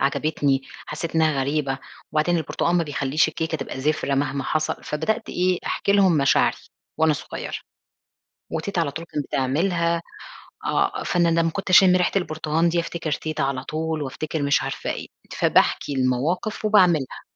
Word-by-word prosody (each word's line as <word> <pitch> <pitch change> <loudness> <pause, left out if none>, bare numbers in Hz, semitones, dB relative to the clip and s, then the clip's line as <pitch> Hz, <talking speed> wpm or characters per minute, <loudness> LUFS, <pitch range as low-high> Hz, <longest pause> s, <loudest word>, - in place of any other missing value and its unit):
عجبتني، 140 -1 +1 0.2
حسيت 165 - -5
إنها 155 -3 +2
غريبة، 135 -1 -1 0.3
وبعدين 155 +3 +2
البرتقال 170 +2 0
ما 170 - +3
بيخلّيش 145 +1 +1
الكيكة 160 0 -2
تبقى 135 -1 -6
زفرة 145 -1 0
مهما 140 0 -1
حصل، 155 0 0
فبدأت 215 +10 -2
إيه 180 0 +1
أحكي 200 - 0
لهم 195 -4 +4
مشاعري 140 -2 +3 0.4
وأنا 160 -1 +4
صغيرة، 145 - -5 1.0
وتيتة 170 +3 -2
على 160 -4 0
طول 165 +3 -6
كانت 150 -3 -4
بتعملها، 170 +5 0 0.7
آه، - - 0
فأنا 175 -2 +2
لمّا 165 0 +2
كنت 195 +2 -5
أشم 185 0 +7
ريحة 180 - +1
البرتقال 160 -2 0
دي 170 0 +1
أفتكر 165 -2 -4
تيتة 155 -3 -2
على 135 -1 -2
طول 160 +1 -2
وأفتكر 150 +3 -4
مش 140 0 +2
عارفة - - -4
إيه، - - -4 0.3
فباحكي - - +2
المواقف 135 - -1
وباعملها، 180 -10 +3
155 Hz, 150 wpm, -23 LUFS, 140-170 Hz, 1.0 s, أشم